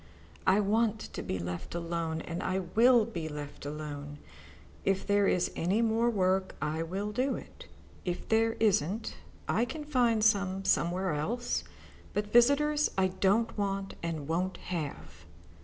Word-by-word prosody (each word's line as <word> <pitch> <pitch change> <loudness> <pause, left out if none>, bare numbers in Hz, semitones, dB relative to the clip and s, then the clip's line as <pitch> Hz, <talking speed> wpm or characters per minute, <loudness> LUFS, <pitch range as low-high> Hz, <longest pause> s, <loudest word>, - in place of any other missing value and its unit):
I 190 +2 +5
want 220 +1 +2
to - - -4
be 95 - -3
left 90 - -5
alone, 165 -1 -2
and 170 +1 -5
I 185 - -1
will 225 +6 +4
be 170 -8 -5
left 145 -1 -7
alone. 145 -1 -6 0.7
If 195 -1 +1
there 205 -1 +3
is 180 - +1
any 195 +7 +1
more 230 +1 +2
work, 190 -3 +1
I 155 +2 -1
will 195 +5 -3
do 255 +5 0
it. - - -10 0.4
If 175 -1 -3
there 225 0 +3
isn't, 210 0 0 0.3
I 225 - +2
can 300 +5 -4
find 240 -6 +2
some 195 -3 +2
somewhere 180 0 +1
else. 235 +12 -1 0.5
But 205 0 -2
visitors 295 +5 +4
I 190 -1 +3
don't 195 +5 +1
want 195 -1 -2
and 160 -4 -3
won't 180 +4 -1 0.2
have." 155 -5 -6
195 Hz, 150 wpm, -30 LUFS, 165-225 Hz, 0.7 s, I